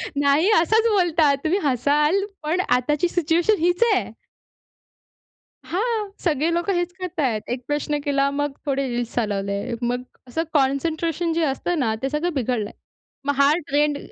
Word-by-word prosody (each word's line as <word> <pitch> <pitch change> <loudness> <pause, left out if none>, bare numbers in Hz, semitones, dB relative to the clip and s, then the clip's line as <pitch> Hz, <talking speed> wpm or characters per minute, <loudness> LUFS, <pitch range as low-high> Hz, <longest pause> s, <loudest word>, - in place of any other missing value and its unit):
नाही 285 +6 +3
असाच 445 +6 +3
बोलतात. 330 -7 +3
तुम्ही 355 +6 +2
हसाल 295 - +2 0.2
पण 335 +5 +1
आताची 295 +7 +1
सिचुएशन 345 +5 +2
हीच 350 +5 +2
आहे. - - -1 1.5
हां, 425 +2 -1
सगळे 320 0 +1
लोकं 345 +3 0
हेच 350 0 -1
करतायत. 290 -12 -1
१ 245 +1 -3
प्रश्न 295 0 -1
केला 280 -1 +2
मग 290 0 -1
थोडे 275 -1 0
रिल्स 240 -1 -3
चालवले. 200 0 -2
मग 245 +1 -1 0.3
असं 320 +7 -2
कॉन्सनट्रेशन 320 +4 0
जे 330 0 +1
असतं 305 +4 -1
ना, 225 -4 +1
ते 270 - 0
सगळं 320 +5 -1
बिघडलंय. 240 -5 -1 0.5
मग 285 - +1
हा 280 +1 +6 0.2
ट्रेंड 295 +1 +2
295 Hz, 145 wpm, -23 LUFS, 270-345 Hz, 1.5 s, हा